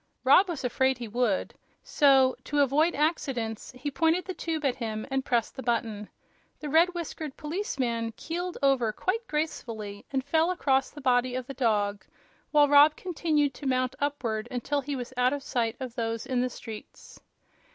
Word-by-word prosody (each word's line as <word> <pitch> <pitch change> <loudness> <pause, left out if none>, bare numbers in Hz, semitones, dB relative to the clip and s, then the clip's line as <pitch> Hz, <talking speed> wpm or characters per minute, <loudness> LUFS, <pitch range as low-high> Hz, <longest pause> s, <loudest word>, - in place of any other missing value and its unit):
Rob 360 +9 +6
was 320 -6 -4
afraid 260 +1 +1
he 240 -2 -6
would; 245 +6 0 0.3
so, 270 -3 +4
to 290 0 +1
avoid 300 +5 +3
accidents, 270 -8 -1
he 285 +3 -4
pointed 325 +4 +1
the 375 - -4
tube 320 -4 -3
at 260 -2 +1
him 220 -3 -4
and 270 0 0
pressed 240 -4 0
the 265 - -6
button. 225 -4 -2 0.5
The 300 - -5
red 335 +4 +4
whiskered 315 -4 -5
policeman 260 - -2
keeled 350 +2 -4
over 265 -5 +3
quite 430 - -2
gracefully 225 -10 -4
and 265 -1 0
fell 320 +4 +2
across 270 -7 +1
the 295 - -11
body 250 -1 +2
of 255 -1 -3
the 275 - -7
dog, 205 -6 0 0.5
while 295 -1 +5
Rob 290 +2 +7
continued 310 -6 0
to 285 - -6
mount 255 0 0
upward 240 -6 -2
until 270 +3 -1
he 280 +1 -4
was 250 0 -6
out 250 +1 +3
of 285 -1 -4
sight 230 -4 -1
of 255 -3 -5
those 230 -2 -3
in 255 -2 0
the 250 - 0
streets. 220 -3 -11
265 Hz, 175 wpm, -28 LUFS, 240-300 Hz, 0.5 s, Rob